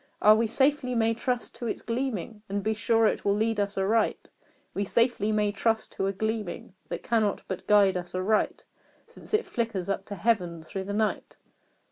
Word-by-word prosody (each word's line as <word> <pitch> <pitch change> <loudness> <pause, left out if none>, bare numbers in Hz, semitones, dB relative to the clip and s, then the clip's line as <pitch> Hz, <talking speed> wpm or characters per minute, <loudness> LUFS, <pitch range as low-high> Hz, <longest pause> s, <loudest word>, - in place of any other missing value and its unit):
Ah, 215 - +7
we 225 +1 +2
safely 265 +1 +1
may 225 0 +3
trust 240 0 -2
to 240 - -5
its - - -3
gleaming, 230 -3 -3
And 200 0 -2
be 220 +1 +1
sure 225 +1 +2
it - - +1
will 200 0 +2
lead 220 +1 0
us 200 0 -1
aright 215 +4 +1 0.4
We 200 - -1
safely 230 0 +1
may 210 -1 +2
trust 220 +2 0
to 195 - -2
a - - +1
gleaming 210 -2 -3 0.2
That - - -4
cannot 215 -3 +1
but 190 0 -5
guide 200 -2 +5
us 175 0 -5
aright, 200 +4 0 0.4
Since - - -13
it 430 +1 +2
flickers 220 -6 -2
up 195 0 -1
to 205 - -6
Heaven 180 -5 0
through 190 +4 -5
the 200 - -4
night." 215 +1 -1
215 Hz, 190 wpm, -27 LUFS, 195-230 Hz, 0.4 s, Ah